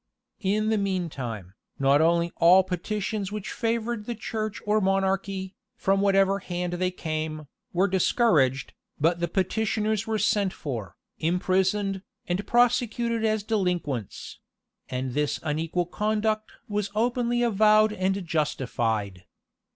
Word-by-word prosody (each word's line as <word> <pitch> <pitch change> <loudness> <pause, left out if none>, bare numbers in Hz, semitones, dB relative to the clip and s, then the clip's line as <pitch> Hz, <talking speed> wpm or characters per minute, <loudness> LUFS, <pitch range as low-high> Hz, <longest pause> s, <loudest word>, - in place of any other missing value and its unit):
In 215 +1 +1
the 220 -1 +2
mean 185 -4 -1
time, 110 -9 -6 0.2
not 140 +2 +4
only 170 +1 +2
all 180 +3 +7
petitions 195 +2 -3
which 210 -2 -5
favored 230 -1 -2
the 240 - -3
church 215 -1 -4
or 210 +1 +2
monarchy, 195 0 0 0.2
from 195 0 +1
whatever 195 0 +3
hand 180 -1 -3
they 180 +1 0
came, 155 -3 -4 0.3
were 185 +3 +2
discouraged, 165 - +2 0.3
but 165 +3 +2
the 170 - 0
petitioners 215 +4 0
were 220 -1 0
sent 200 -3 +1
for, 115 - -6 0.2
imprisoned, 190 +3 +1 0.3
and 185 +3 -2
prosecuted 240 -1 +2
as 215 -1 +1
delinquents; 180 - -2 0.5
and 130 0 -3
this 150 +1 0
unequal 160 +3 -1
conduct 215 +3 -1 0.2
was 205 -1 -2
openly 240 +1 +1
avowed 215 -1 +4
and 190 -1 -1
justified. 115 - -1
190 Hz, 125 wpm, -26 LUFS, 165-215 Hz, 0.5 s, all